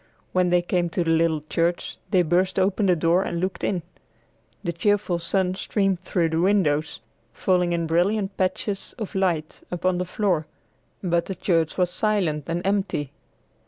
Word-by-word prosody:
When 180 -1 +3
they 175 0 +3
came 175 -1 0
to 175 - 0
the 165 - +1
little 160 -2 +2
church, 170 +2 -1
they 185 -3 +4
burst 180 +4 +1
open 195 +2 +2
the 180 - +4
door 170 +3 +3
and 170 -3 -2
looked 185 +2 -3
in. 180 -4 0 0.8
The 170 - -2
cheerful 200 -1 +1
sun 180 +2 0
streamed 195 -1 0
through 175 -3 0
the 160 +1 0
windows, 160 - +1 0.3
falling 180 +5 +1
in 170 -1 0
brilliant 195 +5 +1
patches 195 +1 -2
of 215 -5 -5
light 175 -5 -1
upon 180 0 0
the 180 - -1
floor, 180 -5 0 0.6
but 170 -2 +1
the 190 - -4
church 165 -5 0
was 180 -1 +2
silent 180 -9 0
and 175 +2 -2
empty. 195 -8 0
180 Hz, 165 wpm, -24 LUFS, 165-190 Hz, 0.8 s, they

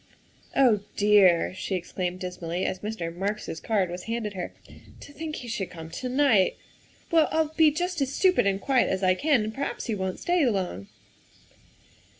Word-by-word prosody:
" - - -32
Oh, 245 -6 +5 0.2
dear," 200 -5 +5
she 190 +1 -3
exclaimed 180 0 -3
dismally 180 -1 -3
as 185 - -2
Mr. 185 -5 -5
Marks 205 +4 -3
's 160 - -5
card 195 -6 0
was 180 0 -6
handed 225 -2 -3
her, 180 -2 -5 0.2
' - - -16
' - - -19
to 285 - -12
think 310 0 -5
he 245 - -7
should 215 -5 -3
come 165 -2 -10
to 255 - -4
night. 255 -8 +3 0.5
Well, 325 -2 +5
I'll 315 -1 0
be 320 -2 +6
just 350 +2 -2
as 270 -1 0
stupid 365 - +3
and 195 0 +1
quiet 265 +3 +2
as 190 0 -1
I 185 0 +5
can, 275 +3 +2
and 215 +1 -4
per 270 - -7
haps - - -3
he 230 - -2
won 190 -2 -2
't - - -14
stay 350 -2 +1
long. 180 - -2
210 Hz, 205 wpm, -26 LUFS, 185-275 Hz, 0.5 s, be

